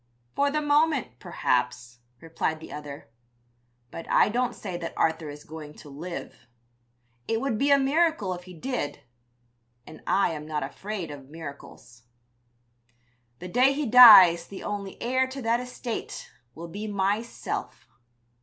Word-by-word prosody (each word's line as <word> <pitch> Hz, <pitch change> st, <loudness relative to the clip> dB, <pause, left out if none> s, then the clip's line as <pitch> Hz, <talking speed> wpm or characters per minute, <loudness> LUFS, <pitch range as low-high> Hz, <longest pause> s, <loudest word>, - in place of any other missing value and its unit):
"'For 285 Hz, 0 st, +2 dB
the 300 Hz, +1 st, -1 dB
moment, 290 Hz, -, +1 dB
perhaps,' 125 Hz, -1 st, -2 dB, 0.2 s
replied 160 Hz, -1 st, -3 dB
the 160 Hz, -, -10 dB
other, 145 Hz, -5 st, -9 dB, 0.8 s
'but 165 Hz, -, -9 dB
I -, -, +4 dB
don't 245 Hz, +2 st, -1 dB
say 190 Hz, -4 st, -6 dB
that 170 Hz, -1 st, -6 dB
Arthur 160 Hz, -1 st, 0 dB
is 145 Hz, 0 st, -10 dB
going 155 Hz, -1 st, -10 dB
to 150 Hz, -, -13 dB
live; 165 Hz, +2 st, -8 dB, 0.8 s
it 225 Hz, 0 st, 0 dB
would 235 Hz, -4 st, -2 dB
be 280 Hz, -, +2 dB
a 280 Hz, -, +6 dB
miracle 275 Hz, -, +1 dB
if 180 Hz, 0 st, -9 dB
he 185 Hz, -1 st, -12 dB
did, 165 Hz, -, -4 dB, 0.8 s
and 155 Hz, -, -13 dB
I 195 Hz, -, +2 dB
am 150 Hz, -1 st, -7 dB
not 155 Hz, -2 st, -2 dB
afraid 185 Hz, +4 st, -6 dB
of 140 Hz, -2 st, -11 dB
miracles. 140 Hz, -6 st, -11 dB, 1.4 s
The 180 Hz, -, -8 dB
day 255 Hz, +8 st, +3 dB
he 295 Hz, +1 st, -2 dB
dies 215 Hz, -8 st, +9 dB
the 195 Hz, -, -9 dB
only 200 Hz, -2 st, -5 dB
heir 260 Hz, +2 st, +1 dB
to 265 Hz, +1 st, -7 dB
that 230 Hz, +1 st, +1 dB
estate 250 Hz, -1 st, -6 dB, 0.2 s
will 170 Hz, +2 st, -8 dB
be 205 Hz, +6 st, -6 dB
myself.' 205 Hz, +3 st, -3 dB
190 Hz, 145 wpm, -26 LUFS, 155-250 Hz, 1.4 s, dies